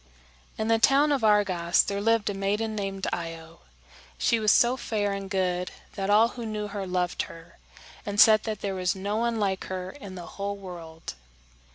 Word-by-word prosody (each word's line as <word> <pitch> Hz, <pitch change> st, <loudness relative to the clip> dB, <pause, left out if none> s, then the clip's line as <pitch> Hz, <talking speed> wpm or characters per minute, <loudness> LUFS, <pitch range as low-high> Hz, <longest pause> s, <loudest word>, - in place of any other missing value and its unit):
In 220 Hz, -, -2 dB
the 225 Hz, 0 st, +3 dB
town 280 Hz, +5 st, +4 dB
of 275 Hz, -5 st, +1 dB
Argos 190 Hz, -5 st, +3 dB
there 200 Hz, 0 st, -3 dB
lived 225 Hz, 0 st, +2 dB
a -, -, -4 dB
maiden 205 Hz, +3 st, -1 dB
named 195 Hz, -2 st, -3 dB
Io. 165 Hz, -1 st, -6 dB, 0.6 s
She 230 Hz, -, +2 dB
was 215 Hz, -2 st, +4 dB
so 240 Hz, +1 st, +4 dB
fair 210 Hz, -5 st, -2 dB
and 195 Hz, -1 st, -5 dB
good 180 Hz, -2 st, -1 dB, 0.2 s
that 195 Hz, -1 st, -3 dB
all 215 Hz, +3 st, +5 dB
who 240 Hz, -1 st, -8 dB
knew 210 Hz, -2 st, -4 dB
her 200 Hz, -1 st, -5 dB
loved 180 Hz, -1 st, -1 dB
her, 165 Hz, -, -14 dB, 0.4 s
and 205 Hz, 0 st, -3 dB
said 215 Hz, 0 st, +8 dB
that 215 Hz, -3 st, -4 dB
there 200 Hz, -1 st, -2 dB
was 185 Hz, 0 st, 0 dB
no 200 Hz, +2 st, -2 dB
one 230 Hz, 0 st, 0 dB
like 195 Hz, -2 st, -1 dB
her 185 Hz, 0 st, -5 dB
in 200 Hz, -10 st, -10 dB
the 175 Hz, -2 st, -7 dB
whole 200 Hz, 0 st, -5 dB
world. 170 Hz, -, -9 dB
200 Hz, 190 wpm, -27 LUFS, 185-220 Hz, 0.6 s, said